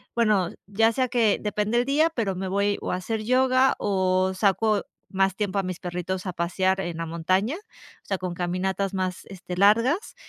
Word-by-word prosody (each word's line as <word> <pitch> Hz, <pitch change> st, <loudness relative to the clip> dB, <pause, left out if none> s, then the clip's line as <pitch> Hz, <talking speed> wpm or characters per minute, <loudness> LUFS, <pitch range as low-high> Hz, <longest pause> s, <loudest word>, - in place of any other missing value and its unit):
bueno, 210 Hz, -7 st, +2 dB, 0.2 s
ya 225 Hz, +3 st, +3 dB
sea 255 Hz, +2 st, 0 dB
que, 230 Hz, -4 st, +2 dB
depende 210 Hz, +2 st, 0 dB
el 245 Hz, -, +1 dB
día, 310 Hz, +4 st, +2 dB
pero 200 Hz, -6 st, -1 dB
me 190 Hz, +1 st, -4 dB
voy 200 Hz, +2 st, +1 dB
o -, -, -3 dB
a -, -, 0 dB
hacer 215 Hz, +4 st, -3 dB
yoga 255 Hz, +2 st, +3 dB
o 185 Hz, -1 st, +1 dB
saco 210 Hz, +2 st, +2 dB, 0.3 s
más 195 Hz, 0 st, +1 dB
tiempo 205 Hz, -1 st, -2 dB
a 195 Hz, -, +1 dB
mis 185 Hz, -1 st, -5 dB
perritos 180 Hz, +1 st, -4 dB
a 185 Hz, -, -3 dB
pasear 185 Hz, +3 st, 0 dB
en 175 Hz, -3 st, -4 dB
la 165 Hz, -, -3 dB
montaña, 185 Hz, -, 0 dB
o 415 Hz, -, -16 dB, 0.4 s
sea, 195 Hz, -, -1 dB
con 180 Hz, -1 st, -4 dB
caminatas 185 Hz, +3 st, -2 dB
más, 185 Hz, -1 st, -3 dB
este, 180 Hz, -2 st, -8 dB
largas. 230 Hz, -, +3 dB
195 Hz, 190 wpm, -25 LUFS, 185-225 Hz, 0.4 s, ya